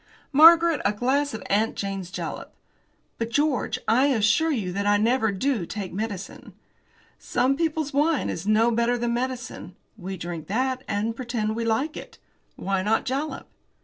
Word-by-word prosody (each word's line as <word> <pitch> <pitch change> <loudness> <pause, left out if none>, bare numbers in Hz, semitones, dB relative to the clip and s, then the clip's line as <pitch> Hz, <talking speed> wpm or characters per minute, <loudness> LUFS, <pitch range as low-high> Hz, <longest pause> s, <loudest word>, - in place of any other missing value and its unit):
"Margaret, 330 +1 +7
a 205 - +2
glass 270 +6 0
of 220 - -7
'Aunt 215 +3 +1
Jane's 195 -2 -4
Jalap.'" - - -6 0.6
"But, 230 0 -2
George, 290 +2 0
I 255 +5 +4
assure 255 +5 +2
you 215 - -1
that 200 +2 -1
I 205 0 +4
never 225 +1 +2
do 225 +1 -1
take 200 -3 -5
medicine." 205 0 -6 0.7
"Some 265 +2 +1
people's 315 -2 -1
wine 295 +1 +2
is 175 +4 -4
no 220 +2 +4
better 235 +1 +1
than 240 0 -1
medicine. 250 -6 -4 0.2
We 190 +1 -6
drink 170 -3 -6
that, 255 +4 -1
and 215 +2 -1
pretend 230 -3 -2
we 230 0 -2
like 265 +8 0
it. - - -10 0.4
Why 195 -1 -1
not 215 +3 +1
jalap?" 270 +2 -3
235 Hz, 160 wpm, -25 LUFS, 205-270 Hz, 0.7 s, Margaret